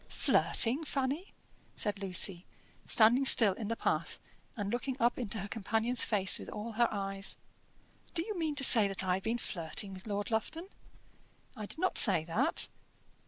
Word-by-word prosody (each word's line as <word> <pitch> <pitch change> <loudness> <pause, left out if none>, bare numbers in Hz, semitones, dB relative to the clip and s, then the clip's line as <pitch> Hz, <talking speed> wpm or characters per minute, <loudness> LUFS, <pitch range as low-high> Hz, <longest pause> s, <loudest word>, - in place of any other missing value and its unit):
"Flirting, 260 +7 +3
Fanny!" 280 +5 -4 0.4
said 205 -1 -3
Lucy, 185 -1 0 0.4
standing 240 +4 +4
still 225 -6 +6
in 210 +2 -8
the 230 - -3
path, - - -3 0.4
and 205 -1 -5
looking 250 +2 -4
up 240 +1 0
into 225 -2 -5
her 200 -1 -6
companion's 225 +3 -1
face 195 -4 +2
with - - -11
all 215 +2 -8
her 235 +2 0
eyes. 195 -1 -2 0.8
"Do 330 - +1
you 430 - -6
mean 320 -4 -4
to 280 - +2
say 225 -5 +8
that 195 -1 -2
I 185 -1 -1
have 190 +1 -4
been 230 +2 -3
flirting 195 -1 -2
with 185 +3 -11
Lord 205 +1 -5
Lufton?" 320 - -4 0.9
"I 210 -1 -8
did - - -5
not 370 +3 0
say 185 -8 +5
that." 165 0 0
220 Hz, 170 wpm, -30 LUFS, 195-250 Hz, 0.9 s, say